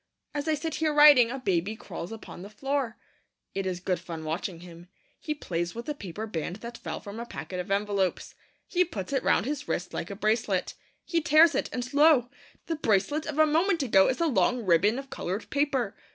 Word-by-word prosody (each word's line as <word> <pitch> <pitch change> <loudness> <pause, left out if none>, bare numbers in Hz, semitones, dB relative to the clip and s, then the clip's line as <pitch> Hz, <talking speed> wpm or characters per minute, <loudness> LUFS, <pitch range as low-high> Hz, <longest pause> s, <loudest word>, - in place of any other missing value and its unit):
As 290 +1 -3
I 315 - +2
sit 320 +1 -4
here 315 -1 +2
writing, 290 -6 +8
a 265 - -4
baby 195 -4 -1
crawls 175 -4 -7
upon 220 -5 -9
the 200 - -9
floor. 270 +1 -2 0.6
It 195 -1 -2
is 180 -1 -2
good 180 -1 -1
fun 165 -2 -7
watching 165 +2 -4
him. 175 0 -12 0.3
He 305 - -3
plays 175 - -3
with 235 +1 -6
the 300 - -2
paper 210 - -6
band 175 -4 -4
that 235 +3 -9
fell 160 -2 -5
from 205 +2 -8
a 235 - -5
packet 180 -5 -6
of 180 - -5
envelopes. 200 -2 0 0.3
He 360 -1 +2
puts 220 - -6
it 270 - +2
round - - +2
his 290 +1 -3
wrist 180 - -3
like 170 - -4
a 200 - -5
bracelet. 215 -2 0 0.3
He 335 -1 0
tears 315 0 +6
it, 275 - -1
and 250 +1 -4
lo, 285 -4 +5 0.3
the 330 - -2
bracelet 230 +6 +1
of 305 -1 -4
a 310 - +6
moment 325 +2 +2
ago 195 -7 +5
is 260 - -1
a 335 - +2
long 250 -4 +2
ribbon 185 +6 +3
of 275 0 -7
coloured 190 +5 -4
paper. 280 -7 0
230 Hz, 210 wpm, -28 LUFS, 190-290 Hz, 0.6 s, writing